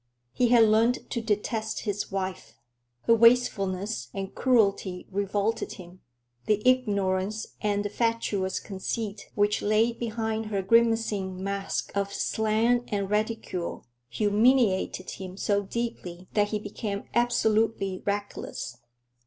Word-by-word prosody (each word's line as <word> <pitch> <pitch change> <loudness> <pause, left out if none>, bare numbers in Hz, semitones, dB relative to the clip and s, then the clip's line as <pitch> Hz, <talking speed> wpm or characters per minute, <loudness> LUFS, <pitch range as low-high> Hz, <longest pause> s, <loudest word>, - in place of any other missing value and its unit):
He 250 - +2
had 235 -1 +6
learned 225 +3 +3
to 235 - -1
detest 220 0 -1
his 205 -2 -3
wife. 190 -11 -4 0.5
Her 230 - +5
wastefulness 205 - +3
and 195 -1 -4
cruelty 200 -7 +1
revolted 200 +3 -1
him. 180 -1 -12 0.5
The 210 -1 +3
ignorance 205 -4 +1 0.2
and 205 -1 0
the - - -1
fatuous 210 -4 0
conceit 205 +1 -5
which 205 0 +2
lay 215 +3 +3
behind 220 -1 -3
her 200 -2 -1
grimacing 215 -4 +2
mask 200 0 -2
of 200 0 0
slang 220 +4 +1
and 200 -1 -1
ridicule 210 -4 -2 0.2
humiliated 210 -3 +2
him 185 -1 -8
so 200 0 +1
deeply 190 -5 -5
that 205 -1 +3
he 210 - -1
became 205 -1 -5
absolutely 220 -5 +1
reckless. 200 - -4
210 Hz, 120 wpm, -27 LUFS, 195-225 Hz, 0.5 s, had